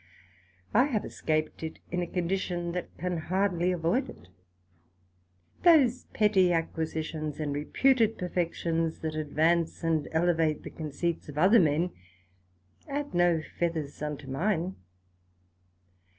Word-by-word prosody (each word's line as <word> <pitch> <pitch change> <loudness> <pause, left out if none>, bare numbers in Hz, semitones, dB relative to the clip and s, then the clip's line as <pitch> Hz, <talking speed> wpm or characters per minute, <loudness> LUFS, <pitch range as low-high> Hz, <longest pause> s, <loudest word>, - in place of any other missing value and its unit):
I 245 +5 +5
have 235 -8 -1
escaped 155 -1 -2
it 160 -1 -5
in 180 0 0
a 175 - -2
condition 175 -1 -2
that 180 +1 -4
can 180 0 -2
hardly 180 +1 0
avoid 175 +9 0
it. 90 - -13 1.3
Those 275 -8 +5
petty 200 -4 +3
acquisitions 160 -2 -2
and 150 -2 -2
reputed 225 - +2
perfections 170 -2 -1
that 160 -1 -2
advance 160 +3 +1
and 160 -2 +1
elevate 160 -2 +1
the - - -8
conceits 160 +1 -3
of 145 - -8
other 195 +9 +6
men, 165 +1 +2 1.0
add 285 +1 -3
no 175 -2 +3 0.2
feathers 160 -5 -2
unto 150 -2 -4
mine. 175 +5 -1
170 Hz, 120 wpm, -29 LUFS, 155-185 Hz, 1.3 s, other